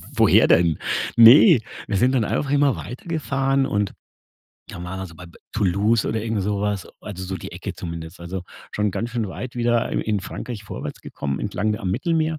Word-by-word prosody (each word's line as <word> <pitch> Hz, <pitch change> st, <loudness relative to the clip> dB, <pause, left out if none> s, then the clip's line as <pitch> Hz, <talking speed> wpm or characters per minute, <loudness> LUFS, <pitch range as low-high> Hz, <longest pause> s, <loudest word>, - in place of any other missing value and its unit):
woher -, -, +5 dB
denn? 85 Hz, -2 st, +4 dB, 0.4 s
Ne, 125 Hz, -, +9 dB, 0.3 s
wir 100 Hz, -, 0 dB
sind 125 Hz, +5 st, +3 dB
dann 125 Hz, -4 st, +2 dB
einfach 140 Hz, +6 st, -1 dB
immer 145 Hz, -2 st, +3 dB
weiter 125 Hz, +7 st, -8 dB
gefahren 135 Hz, -4 st, 0 dB
und 100 Hz, -4 st, -1 dB, 0.8 s
da 85 Hz, -, -8 dB
waren 90 Hz, +2 st, -5 dB
wir 95 Hz, -, -5 dB
so 85 Hz, -, -14 dB
bei 90 Hz, +2 st, -11 dB
be 85 Hz, -, -17 dB
Toulouse 105 Hz, +2 st, +2 dB
oder 110 Hz, 0 st, -1 dB
irgend 110 Hz, -3 st, -1 dB
sowas, 100 Hz, 0 st, -2 dB
also 95 Hz, -3 st, -7 dB
so 95 Hz, +1 st, -4 dB
die 85 Hz, -, -9 dB
Ecke -, -, -5 dB
zumindest. 85 Hz, 0 st, -7 dB
Also, 90 Hz, +2 st, -5 dB, 0.3 s
schon 105 Hz, 0 st, 0 dB
ganz 115 Hz, +5 st, -3 dB
schön 115 Hz, -3 st, -2 dB
weit 125 Hz, +6 st, -7 dB
wieder 120 Hz, -1 st, +1 dB
i -, -, +1 dB
in 105 Hz, -2 st, -1 dB
Frankreich 110 Hz, +2 st, -7 dB
vorwärts -, -, -7 dB
gekommen, 70 Hz, -1 st, -4 dB
entlang 105 Hz, +1 st, -1 dB
da 105 Hz, -, -3 dB
am 95 Hz, -, -2 dB
Mittelmeer 160 Hz, -, 0 dB
105 Hz, 200 wpm, -22 LUFS, 95-125 Hz, 0.8 s, Ne